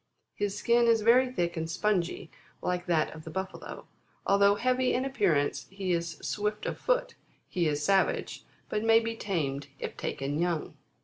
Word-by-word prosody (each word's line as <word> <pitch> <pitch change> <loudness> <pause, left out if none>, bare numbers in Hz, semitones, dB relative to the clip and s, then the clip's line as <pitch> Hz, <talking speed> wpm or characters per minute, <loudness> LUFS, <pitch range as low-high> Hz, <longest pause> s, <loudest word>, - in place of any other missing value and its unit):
His 205 0 -2
skin 235 +2 +3
is 225 -2 +4
very 250 +3 +5
thick 175 -7 -1
and 160 -1 -3
spongy, 185 0 -1 0.3
like 180 0 -2
that 160 -3 +1
of 155 0 -10
the 160 - -8
Buffalo. 190 +4 -6 0.4
Although 200 0 +5
heavy 255 +3 +1
in 255 +2 0
appearance, 195 - +1
he 195 -1 -3
is 170 0 -2
swift 210 0 -2
of - - -3
foot; - - +1 0.3
he 175 -4 0
is 150 0 -1
savage, 195 -1 +1 0.2
but 210 0 -2
may 225 0 +6
be 230 0 -3
tamed 145 -10 -2
if - - -5
taken 140 +2 -3
young. 170 -2 -1
195 Hz, 170 wpm, -29 LUFS, 170-225 Hz, 0.4 s, may